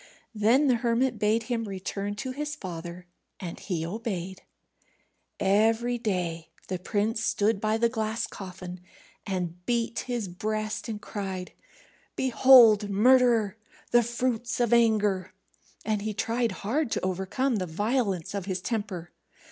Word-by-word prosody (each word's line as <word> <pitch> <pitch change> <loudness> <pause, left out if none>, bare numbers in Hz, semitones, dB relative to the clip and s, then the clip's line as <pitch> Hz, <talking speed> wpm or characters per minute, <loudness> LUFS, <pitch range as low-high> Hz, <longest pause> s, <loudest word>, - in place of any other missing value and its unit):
Then 230 +7 +4
the 255 -4 +4
hermit 235 0 +1
bade 215 +2 +2
him 230 -1 -2
return 200 +1 -4
to 255 +5 -4
his 295 +3 -4
father, 175 - -7 0.3
and 175 -3 -6
he 170 -4 -3
obeyed. 190 -2 -4 1.0
Every 225 +5 +2
day 175 -7 -2 0.2
the 185 -1 -2
prince 215 +4 -1
stood 205 -1 +1
by 215 0 +1
the 235 +1 +3
glass 220 -1 -2
coffin, 180 -2 -8 0.5
and 180 -2 -3
beat 235 -1 0
his 240 -5 -2
breast 215 +5 -3
and 215 -2 -4
cried, 190 -4 -5 0.6
"Behold, 240 -5 +6
murderer, 230 -1 +4 0.3
the 240 - +6
fruits 235 0 -2
of 240 -1 +2
anger!" 210 -5 +2 0.5
And 215 -2 0
he 215 0 -3
tried 230 +1 0
hard 275 +6 0
to - - -1
overcome 190 +7 0
the 185 -2 -2
violence 200 0 -1
of 200 -3 -3
his 185 -1 -1
temper. 190 -5 -4
215 Hz, 135 wpm, -27 LUFS, 190-235 Hz, 1.0 s, Behold